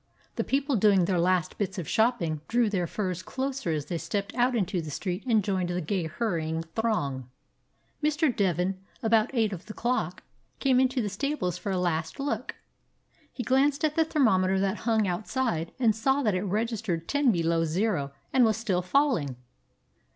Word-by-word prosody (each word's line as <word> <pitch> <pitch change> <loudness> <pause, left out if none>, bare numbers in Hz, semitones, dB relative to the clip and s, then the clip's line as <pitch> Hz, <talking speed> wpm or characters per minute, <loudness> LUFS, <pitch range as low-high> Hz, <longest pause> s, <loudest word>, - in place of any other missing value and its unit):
The - - 0
people 275 -1 0
doing 195 -3 +4
their 180 -1 +1
last 180 0 +1
bits 200 -1 -2
of 170 -5 -4
shopping 170 -10 +1
drew 235 -2 +2
their 180 -4 0
furs 185 -1 -3
closer 265 +1 -3
as 155 -3 -1
they 170 - -3
stepped 200 +3 -3
out 245 +1 +2
into 190 -4 0
the 155 - -7
street 180 +5 -3
and 220 -4 +3
joined 185 -3 -1
the 175 0 -1
gay 175 0 -1
hurrying 165 -4 -2
throng. 140 - -1 0.7
Mr. 300 -4 +2
Devin, 185 -1 0 0.2
about 225 0 +3
eight 220 -3 +2
of 185 +1 -8
the 215 - -8
clock, 250 +2 -1 0.3
came 260 -2 +3
into 260 -1 +2
the - - -1
stables 205 - -2
for 200 - -3
a 190 - 0
last 165 - -1
look. 255 -4 -3 0.8
He 245 - -5
glanced 275 +5 +2
at 305 -1 0
the 325 - +4
thermometer 195 - +2
that 195 +2 0
hung 220 -2 +3
out 180 +3 -3
side 225 -11 -1
and 230 -5 +3
saw 265 +5 +1
that 210 -4 +2
it 185 - 0
registered 205 -4 -2
ten 285 -3 +3
below 165 -3 +1
zero 165 -3 0 0.2
and 260 - +5
was 220 -2 +3
still 200 -6 0
falling. 180 - +1
205 Hz, 180 wpm, -27 LUFS, 175-245 Hz, 0.8 s, and